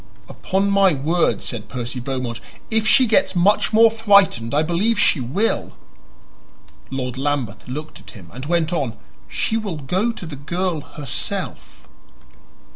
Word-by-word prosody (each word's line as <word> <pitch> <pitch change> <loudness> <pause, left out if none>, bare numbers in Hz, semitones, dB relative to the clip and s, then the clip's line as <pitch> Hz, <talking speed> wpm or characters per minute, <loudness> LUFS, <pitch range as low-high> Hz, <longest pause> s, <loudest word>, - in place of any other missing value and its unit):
"Upon 195 +1 -1
my 195 -2 +4
word," 160 +6 +1
said 115 -4 -5
Percy 125 0 -4
Beaumont, 125 -2 -4 0.3
"if 220 -1 +1
she 260 +2 +6
gets 220 -3 +2
much 200 +5 +3
more 225 +1 +6
frightened 200 - +3
I 150 +2 +2
believe 190 +8 +1
she 155 - +3
will." 170 - -1 1.2
Lord 130 -1 -4
Lambeth 135 -7 -2
looked 150 +5 -7
at - - -14
him, 85 -4 -14
and 130 +2 -7
he - - -7
went 170 -1 +1
on. 130 -9 -2 0.3
"She 220 - -1
will 205 -7 -4
go 185 - 0
to 210 - -9
the 160 -3 -7
girl 170 +4 -2
herself." 145 -2 -6
160 Hz, 150 wpm, -21 LUFS, 130-200 Hz, 1.2 s, she